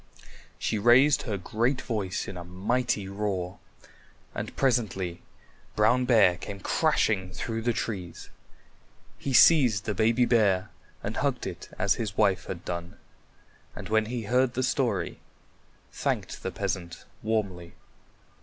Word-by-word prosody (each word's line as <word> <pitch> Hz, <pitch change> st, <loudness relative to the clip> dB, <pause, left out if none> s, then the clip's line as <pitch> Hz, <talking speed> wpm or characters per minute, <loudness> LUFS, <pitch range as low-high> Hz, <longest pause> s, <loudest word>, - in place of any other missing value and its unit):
She 110 Hz, -, -1 dB
raised 125 Hz, +6 st, +5 dB
her 100 Hz, -, -1 dB
great 120 Hz, +8 st, 0 dB
voice 100 Hz, -5 st, -3 dB
in -, -, -6 dB
a 90 Hz, -, -6 dB
mighty 105 Hz, +4 st, -1 dB
roar, 100 Hz, -2 st, -3 dB, 0.7 s
and -, -, -5 dB
presently 95 Hz, -9 st, 0 dB, 0.5 s
Brown 115 Hz, +4 st, +3 dB
Bear 105 Hz, -8 st, +5 dB
came 100 Hz, +1 st, -7 dB
crashing 95 Hz, 0 st, +1 dB
through 115 Hz, +4 st, -4 dB
the 120 Hz, +2 st, +1 dB
trees. 95 Hz, -7 st, -5 dB, 0.9 s
He 140 Hz, -, -3 dB
seized 125 Hz, -7 st, +6 dB
the 105 Hz, -, -1 dB
baby 115 Hz, +3 st, +3 dB
bear 105 Hz, -6 st, +2 dB, 0.3 s
and -, -, -4 dB
hugged -, -, -1 dB
it -, -, -7 dB
as 95 Hz, +1 st, +2 dB
his 105 Hz, -4 st, -4 dB
wife 100 Hz, -4 st, +2 dB
had 85 Hz, -2 st, -6 dB
done, 85 Hz, 0 st, -5 dB, 0.8 s
and -, -, -8 dB
when 110 Hz, 0 st, +2 dB
he 120 Hz, 0 st, -3 dB
heard 125 Hz, +3 st, +1 dB
the 130 Hz, -, 0 dB
story 125 Hz, -6 st, -1 dB, 0.7 s
thanked -, -, -3 dB
the -, -, -3 dB
peasant 85 Hz, -2 st, -4 dB, 0.2 s
warmly. 100 Hz, -6 st, -2 dB
105 Hz, 135 wpm, -27 LUFS, 95-120 Hz, 0.9 s, seized